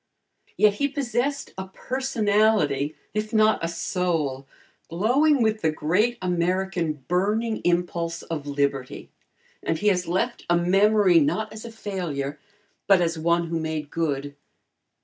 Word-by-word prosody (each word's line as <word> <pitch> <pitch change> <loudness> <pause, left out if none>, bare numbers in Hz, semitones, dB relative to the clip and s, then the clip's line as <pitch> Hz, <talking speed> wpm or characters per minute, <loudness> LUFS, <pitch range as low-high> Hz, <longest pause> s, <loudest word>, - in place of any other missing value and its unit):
Yet 210 -1 +5
he 280 +7 0
possessed 275 0 -2
a 190 - -5
personality, 210 - +1 0.2
if 215 0 -2
not 215 -4 +3
a - - +1
soul, 165 -5 -2 0.4
glowing 250 - +3
with 220 0 0
the 160 - +2
great 185 +10 +1
American 175 -4 -1
burning 215 +5 0
impulse 170 -1 -1
of 150 -3 -5
liberty, 140 -2 -2 0.5
and 160 - -1
he 210 +5 +2
has 180 -2 0
left 210 +8 -1
a 175 - +4
memory, 195 +1 +4
not 175 +9 0
as 215 +1 -9
a 230 - -7
failure, 165 -10 -4 0.5
but 195 -2 +6
as 170 -2 0
one 170 +1 +1
who 165 0 -1
made 155 -2 -4
good. 145 -3 -2
180 Hz, 135 wpm, -24 LUFS, 160-215 Hz, 0.5 s, but